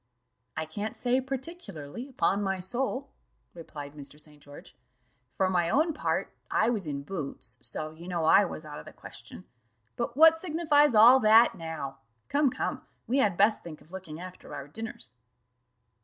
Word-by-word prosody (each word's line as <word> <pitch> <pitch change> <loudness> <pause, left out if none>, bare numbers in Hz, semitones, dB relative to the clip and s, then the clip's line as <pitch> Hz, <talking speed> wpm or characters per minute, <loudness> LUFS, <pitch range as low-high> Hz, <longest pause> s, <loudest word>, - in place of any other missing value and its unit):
"I 160 - -1
can't 205 +8 -5
say 250 +1 +2
particularly, 260 - -6
upon 205 -6 +1
my 195 -1 0
soul," 255 +8 -3 0.4
replied 145 -4 -9
Mr. 145 0 -9
St. 150 -1 -10
George; 145 0 -13 0.6
"for 190 - +3
my 175 -2 +1
own 315 - +2
part, 300 - -2
I 235 - +2
was 205 -8 -3
in 140 -1 -4
boots, 140 -8 -6
so 155 0 -5
you 165 +3 -12
know 170 -3 -1
I 200 - +7
was 165 -4 -6
out 150 0 -8
of - - -11
the - - -11
question. - - -11 0.5
But 235 +1 -3
what 325 +1 +7
signifies 305 -6 +3
all 240 +5 +9
that 225 0 +6
now? 160 -6 -6 0.3
Come, 285 -1 +3
come, - - -3 0.2
we 260 +4 +1
had 200 -8 +2
best 210 +2 +4
think 160 -3 -9
of 160 - -19
looking 175 -5 -8
after 180 -4 -9
our 140 -1 -7
dinners." 225 - -7
195 Hz, 170 wpm, -28 LUFS, 155-255 Hz, 0.6 s, all